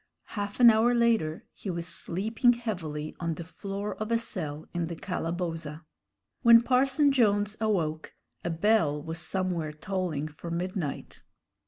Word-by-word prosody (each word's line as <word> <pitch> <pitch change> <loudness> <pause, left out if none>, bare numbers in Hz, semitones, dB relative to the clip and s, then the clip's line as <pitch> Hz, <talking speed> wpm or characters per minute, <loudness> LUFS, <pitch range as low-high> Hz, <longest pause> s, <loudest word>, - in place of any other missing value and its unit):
Half 205 0 -4
an 240 -2 +9
hour 230 +3 +3
later 225 -10 +1
he 200 - -7
was 170 -2 -3
sleeping 220 +8 +1
heavily 170 -11 -4
on 165 -2 -2
the 170 - -6
floor 200 +4 -5
of 215 +1 -4
a 230 - +4
cell 160 -10 -5
in 170 -2 -1
the 170 - -5
calaboza. 165 -3 -4 0.6
When 235 0 +8
Parson 270 +4 +3
Jones 210 -5 +2
awoke, 165 -8 -1 0.3
a - - -1
bell 165 -4 +2
was 160 +2 -6
somewhere 175 -3 -1
tolling 160 -2 -3
for 155 +3 -9
midnight. 175 -2 -4
185 Hz, 145 wpm, -28 LUFS, 160-220 Hz, 0.6 s, an